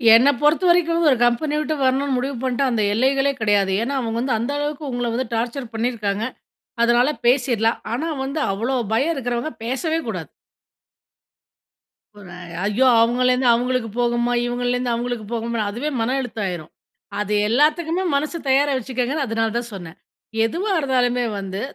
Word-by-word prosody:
என்ன 250 +5 +6
பொறுத்தவரைக்கும் 335 +2 +3
ஒரு 265 - +4
கம்பெனி 285 +6 +1
விட்டு 305 0 -1
வரணும்னு 265 +1 +1
முடிவு 270 +2 -2
பண்ணிட்டா, 260 +1 0
அந்த 220 -3 +1
எல்லைகளே 270 +4 +2
கிடையாது. 205 -2 +2
ஏன்னா 275 +4 -2
அவங்க 230 -2 -3
வந்து, 255 +1 0
அந்த 235 +5 -2
அளவுக்கு 295 0 -3
உங்கள 245 0 -2
வந்து 255 +3 -1
டார்ச்சர் 235 +2 -3
பண்ணிருக்காங்க. 220 -3 -1 0.6
அதனால 240 +3 +4 0.2
பேசிறலாம். 240 -3 +2
ஆனா 315 +7 -2
வந்து, 275 +4 -3
அவ்ளோ 230 +7 -1 0.2
பயம் 275 +9 +2
இருக்கிறவங்க 245 +2 -2
பேசவே 315 +7 -1
கூடாது. - - -5 1.9
ஒரே 180 -3 -11 0.3
ஐயோ! 210 +6 +2
அவங்கள்லேருந்து 250 +2 +2
அவங்களுக்கு 245 0 0
போகுமா, 240 0 +1
இவங்கள்லேருந்து 245 0 -1
அவங்களுக்கு 240 -1 -3
போகுமா 230 0 -2
அதுவே 250 +8 -3
மன 245 +4 0
அழுத்தாமாயிரும். 195 -9 -5 0.5
அது 210 0 -1 0.2
எல்லாத்துக்குமே 320 +7 +2
மனசு 305 +4 -1
தயாரா 280 +2 +3
வச்சுக்கங்கன்னு, 255 +3 -2
அதனால 225 -1 -1
தான் 235 -1 -4
சொன்னேன். 175 -2 -9 0.5
எதுவா 370 - -2
இருந்தாலுமே 250 -3 +1 0.2
வந்து 195 +1 -5
245 Hz, 140 wpm, -21 LUFS, 230-275 Hz, 1.9 s, என்ன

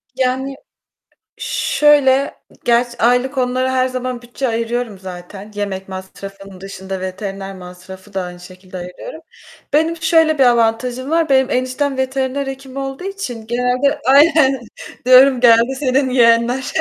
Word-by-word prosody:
Yani, 265 +1 -1 0.8
şöyle, 280 -2 +2 0.3
gerçi, 240 0 +1
aylık 245 +3 +1
onlara 255 +1 0
her 255 0 +2
zaman 255 -1 -4
bütçe 245 +2 -4
ayırıyorum 230 -2 -3
zaten. 190 +3 -10
Yemek 195 -2 -4
masrafım 195 0 -10
dışında 190 -1 -7
veteriner 195 +1 -6
masrafı 185 +2 -12
da 190 - -1
aynı 180 0 -9
şekilde 185 +1 -12
ayırıyorum. 180 - -9 0.5
Benim 320 +2 +2
şöyle 320 -2 +2
bir - - +6
avantajım 245 +2 +1
var: 325 -2 +1
Benim 265 0 +3
eniştem 255 +2 -1
veteriner 265 +1 -2
hekim 270 0 -8
olduğu 270 +4 -5
için 260 - -6
genelde 250 +4 0
Aynen. 280 -1 +5 0.5
Diyorum: 255 0 +6
"Geldi 235 +2 +4
senin 265 -1 +1
yeğenler. 240 +1 +2
250 Hz, 130 wpm, -17 LUFS, 200-270 Hz, 0.8 s, bir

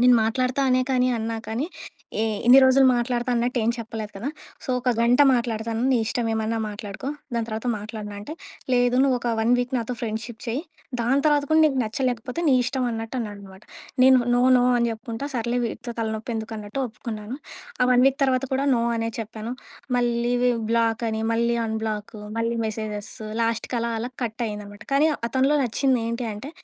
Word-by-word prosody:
నేను 250 0 +7
మాట్లాడుతా 255 +4 0
అనే 255 - +4
కానీ 255 -1 +3
అన్నా 225 0 -2
కానీ 230 +6 -2 0.6
ఏ - - +2 0.2
ఇన్ని 250 +2 +9
రోజులు 260 +1 +6
మాట్లాడతా 240 +1 -1
అన్నట్టు 245 +2 0
ఏమి 230 +2 +2
చెప్పలేదు 220 -2 -6
కదా! 230 +8 -3 0.4
సో, - - -11
ఒక 250 +1 +1
గంట 240 +4 +4
మాట్లాడతాను 230 -1 -1
నీ 260 - +4
ఇష్టం 235 +1 -1
ఏమన్నా 220 +1 -1
మాట్లాడుకో 205 +4 -6 0.3
దాని 230 -1 -1
తర్వాత 220 +2 -4
మాట్లాడను 210 -1 -7
అంటే, 205 +9 -7 0.4
"లేదు 245 0 +3
నువ్వు 270 -2 +3
ఒక 240 - -2
1 225 +2 +3
వీక్ 245 +1 -2
నాతో 240 +1 -2
ఫ్రెండ్‌షిప్ 225 0 -4
చెయ్యి 240 +6 -2 0.4
దాని 255 +4 +2
తరువాత 295 -2 +4
కూడా 315 0 +5
నీకు 290 -3 +2
నచ్చలేకపోతే 250 +3 -2
నీ 270 - +5
ఇష్టం" 255 +1 -1
అన్నట్టు 225 +1 -5
అన్నాడన్నమాట. 200 -3 -8 0.4
నేను 260 0 +7 0.2
నో. 245 - +3 0.2
నో. 245 - +3
అని 235 0 +2
చెప్పుకుంటా 230 +3 -5
సర్లే 240 +1 0
వీడితో 235 +1 -5
తలనొప్పి 220 +1 -2
ఎందుకు 220 0 -4
అన్నట్టు 210 +5 -5
ఒప్పుకున్నాను. 220 0 -6 0.5
ఆ - - +6
1 250 0 +5
వీక్ 270 0 +2
తర్వాత 260 0 +1
కూడా 270 +1 +1
నో 235 - +1
అనే 225 0 -1
చెప్పాను. 220 +1 -5 0.5
మళ్ళీ 240 0 +1
వి 250 - +4 0.2
బ్లాక్ 230 0 +1
అని, 220 0 -2
మళ్ళీ 235 +1 +2
అన్‌బ్లాకు, 220 -1 -3 0.2
మళ్ళీ 230 +1 0
మెసేజెస్సు 215 0 -5
లాస్ట్‌కలా, 230 +1 -1
అలా 245 +2 -4
కట్ 225 0 -5
అయిందనమాట. 205 0 -8
కానీ 295 +3 +5 0.2
అతనిలో 265 +4 +2
నచ్చింది 255 +1 +1
ఏంటి 235 +1 -2
అంటే, 245 +8 -7
235 Hz, 180 wpm, -24 LUFS, 220-250 Hz, 0.6 s, ఇన్ని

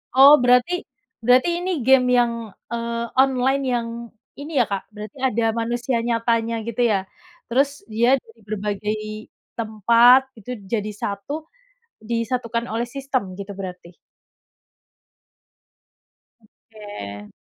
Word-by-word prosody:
Oh 275 +2 +9
berarti 250 +9 +3 0.4
berarti 250 +7 +4
ini 370 +1 -2
game 260 -1 +5
yang, 240 -1 +3 0.4
eee, 235 0 -2 0.2
online 265 +1 +2
yang 235 -1 -1 0.5
ini 295 +3 -7
ya, - - +5
Kak, 195 -1 -2
berarti 210 +3 -9
ada 235 -2 -1 0.2
manusia 240 +2 -1
nyatanya 230 0 0
gitu 235 0 -5
ya? 205 - +3 0.5
Terus 275 +3 +3 0.2
dia 235 +3 +3
dari 225 -3 -17
berbagai 210 0 -2 0.6
tempat 230 +3 +5 0.2
gitu 215 - -14 0.2
jadi 215 -2 -1
satu 205 +11 -4 0.6
disatukan 230 +1 -2
oleh 235 +2 -1
sistem 270 -1 -2
gitu 200 +1 -7
berarti? 180 -2 -8 2.5
Oke. 205 - -10
230 Hz, 110 wpm, -22 LUFS, 215-250 Hz, 2.5 s, Oh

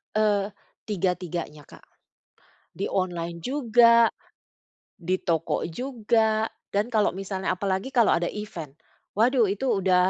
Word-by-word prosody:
Eee, 205 -2 +2 0.4
tiga-tiganya, 175 -6 -3
Kak. - - -16 0.9
Di 195 - -1
online 170 -2 -2
juga, 235 - +5 0.9
di 185 +1 -2
toko 165 -1 -1
juga, 220 +1 0 0.2
dan 205 +3 +1
kalau 220 -4 +2
misalnya 190 0 -3
apalagi 190 +6 -2
kalau 240 -4 +4
ada 175 0 -1
event. 175 -9 -7 0.4
Waduh, 235 +2 +3
itu 205 +7 -2 0.2
udah 185 0 +4
200 Hz, 115 wpm, -25 LUFS, 180-225 Hz, 0.9 s, juga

